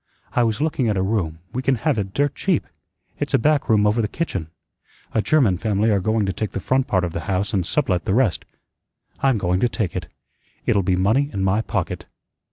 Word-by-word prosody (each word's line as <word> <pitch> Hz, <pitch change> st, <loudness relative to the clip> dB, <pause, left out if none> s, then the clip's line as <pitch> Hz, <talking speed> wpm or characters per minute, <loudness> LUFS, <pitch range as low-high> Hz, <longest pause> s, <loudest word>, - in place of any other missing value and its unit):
I 125 Hz, -, +3 dB
was 115 Hz, -1 st, +1 dB
looking 145 Hz, -6 st, 0 dB
at 105 Hz, -, 0 dB
a 95 Hz, -, +1 dB
room; 90 Hz, -6 st, -1 dB
we 130 Hz, -, -1 dB
can 135 Hz, 0 st, +2 dB
have 135 Hz, 0 st, 0 dB
it 95 Hz, -1 st, -3 dB
dirt 145 Hz, 0 st, +1 dB
cheap. 180 Hz, -1 st, 0 dB, 0.5 s
It's 145 Hz, -1 st, 0 dB
a -, -, +6 dB
back 150 Hz, +4 st, +2 dB
room 105 Hz, -2 st, +4 dB
over 105 Hz, +3 st, +3 dB
the 105 Hz, -, 0 dB
kitchen. 100 Hz, -, -3 dB, 0.7 s
A 110 Hz, -, +2 dB
German 115 Hz, -, +3 dB
family 110 Hz, 0 st, +1 dB
are 100 Hz, -, +3 dB
going 110 Hz, +2 st, +1 dB
to 95 Hz, -, -1 dB
take 105 Hz, +3 st, -4 dB
the -, -, -2 dB
front 130 Hz, +6 st, +1 dB
part 95 Hz, -2 st, +1 dB
of 85 Hz, -2 st, -2 dB
the 85 Hz, -, -4 dB
house 95 Hz, +1 st, 0 dB
and 95 Hz, -3 st, +2 dB
sublet 90 Hz, -, 0 dB
the 95 Hz, -, +1 dB
rest. 110 Hz, -, +2 dB, 0.8 s
I'm 135 Hz, -4 st, +3 dB
going 90 Hz, -2 st, 0 dB
to 120 Hz, -, +2 dB
take 100 Hz, -7 st, -2 dB
it. -, -, -3 dB, 0.6 s
It'll 100 Hz, -, +3 dB
be 95 Hz, 0 st, +1 dB
money 110 Hz, +10 st, +2 dB
in 95 Hz, -, -2 dB
my 95 Hz, +3 st, +2 dB
pocket." -, -, -3 dB
105 Hz, 225 wpm, -22 LUFS, 95-130 Hz, 0.8 s, a